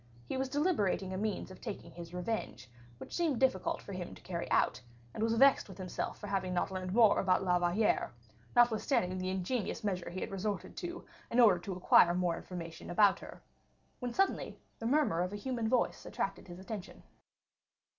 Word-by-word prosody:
He - - -4
was 265 0 -1
deliberating 260 - +1
a - - -3
means 210 -2 -2
of 185 - -12
taking 170 - -6
his 170 0 -9
revenge, 180 - -4 0.3
which - - -10
seemed 320 -8 +1
difficult 255 -9 +1
for 200 - -8
him 180 -1 -6
to - - -15
carry 170 -2 -4
out, - - +2 0.3
and - - -5
was 225 +1 +2
vexed 270 -2 +5
with 190 - -10
himself 185 -1 -4
for - - -8
not 200 - -6
having 185 -2 -1
learned 185 0 -2
more 220 0 +5
about 185 -1 +2
La 180 -1 +3
Valliere, 175 +5 +1 0.4
notwithstanding 230 -5 +3
the 185 0 -2
ingenious 190 +6 -2
measures 185 -5 -2
he 185 - -3
had - - -4
resorted 195 -1 -3
to 350 0 -5 0.2
in 235 - +1
order 210 -7 +7
to 190 +2 -5
acquire 175 -1 +5
more 180 -2 +1
information 170 -2 -8
about 200 +2 +4
her, - - -11 0.6
when 245 -1 -3
suddenly 390 +9 0 0.2
the 225 - -2
murmur 265 - +2
of 180 +2 -2
a - - -3
human 230 +1 -2
voice 250 0 +1
attracted 195 0 -4
his 175 -1 -9
attention. 195 0 -8
195 Hz, 190 wpm, -33 LUFS, 180-230 Hz, 0.6 s, order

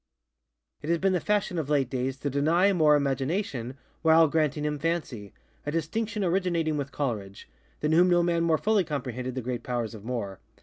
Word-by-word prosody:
It 150 - -6
has 170 - +3
been 190 +2 +1
the 180 - +2
fashion 205 -2 0
of 150 -3 -4
late 140 -3 +2
days 130 0 -2
to 145 - -1
deny 165 +8 +3
Moore 155 -4 +5
Imagination, 135 - -2 0.2
while 160 0 +6
granting 150 -1 0
him 150 -1 -2
FancyŌĆöa 140 -10 -3 0.4
distinction 205 +8 -2
originating 170 -3 0
with 140 -1 -3
ColeridgeŌĆöthan 105 -9 -4 0.4
whom 165 +4 +4
no 175 -1 +4
man 170 -1 +1
more 165 -1 +3
fully 210 0 +2
comprehended 130 -5 -4
the 130 - -3
great 120 0 -3
powers 120 -2 -3
of 105 -3 -10
Moore. 110 -5 -4
150 Hz, 175 wpm, -27 LUFS, 130-170 Hz, 0.4 s, while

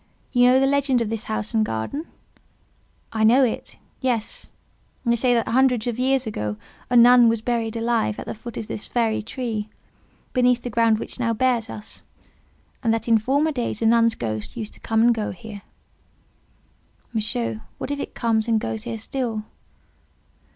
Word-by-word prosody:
You 245 -1 +4
know 255 +1 +5
the 270 - +3
legend 275 -2 +2
of 225 -1 -2
this 225 -1 -3
house 215 +1 -1
and 220 -1 +3
garden?" 215 - -3 1.1
"I 220 -1 0
know 245 +5 +6
it. 240 - -2 0.2
Yes. 255 - -2 0.6
They 235 0 +3
say 245 +2 +2
that 230 - 0
hundreds 250 -2 +3
of 240 -1 -2
years 260 0 +2
ago 105 - -3 0.3
a 245 - +4
nun 240 0 +8
was 225 -1 -1
buried 230 -2 -1
here 230 - -2
alive 230 - +1
at - - -6
the - - -4
foot 230 +1 -9
of - - -4
this 210 - -6
very 230 -2 0
tree, 220 -2 -4 0.6
beneath 250 -1 +3
the 245 - -4
ground 230 0 +3
which 230 - -6
now 230 -2 0
bears 245 -1 +1
us." 210 - -6 0.8
"And 230 - +1
that 225 - -5
in 225 -1 +5
former 280 +8 +1
days 240 -5 -2
a - - +2
nun's 230 0 +4
ghost 110 - -4
used 215 -2 -5
to - - -12
come 225 0 +1
and 240 0 +5
go 220 -2 -2
here." 205 +2 -9 1.5
"Monsieur, 120 - -2 0.2
what - - -5
if 285 - -2
it - - -6
comes 225 -1 +1
and 225 -1 +3
goes 220 0 -4
here 230 -1 -4
still?" 225 -1 -3
230 Hz, 185 wpm, -23 LUFS, 220-250 Hz, 1.5 s, nun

